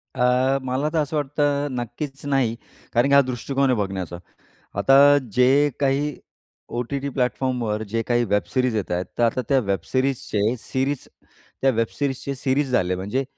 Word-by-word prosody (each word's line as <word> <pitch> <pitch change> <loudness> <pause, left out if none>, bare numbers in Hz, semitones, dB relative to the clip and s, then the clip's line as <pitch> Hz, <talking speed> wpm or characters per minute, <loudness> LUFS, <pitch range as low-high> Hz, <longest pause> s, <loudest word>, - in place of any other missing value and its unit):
अ, 125 +2 +3
मला 130 +3 -1
तर - - 0
असं 150 +1 -1
वाटतं 145 0 0
नक्कीच 130 +4 -5
नाही, 135 -5 +1 0.4
कारण 120 +3 +3
की 140 - +1
हा 140 - +8
दृष्टिकोन 135 +1 -1
आहे 125 - +2
बघण्याचा. 95 -3 -3 0.6
आता 140 +6 +6
जे 135 +5 +4
काही 140 +1 +1 0.6
ओ-टी-टी 135 +4 -2
प्लॅटफॉर्मवर 125 -4 -1
जे 115 +2 0
काही 120 0 +1
वेब 105 -3 +1
सिरीज 130 -3 +1
येत 105 -4 -2
आहेत, 90 +1 -1
तर 120 - +2
आता 120 +2 +2
त्या 135 -2 +4
वेब 100 -5 -1
सिरीजचे 125 -4 0
सिरीज 135 +3 -2 0.5
त्या 135 - +4
वेब 115 -2 0
सिरीजचे 140 -1 -2
सिरीज 135 +2 0
झाले, 90 -7 +1
म्हणजे 105 +9 -2
130 Hz, 160 wpm, -23 LUFS, 115-140 Hz, 0.6 s, हा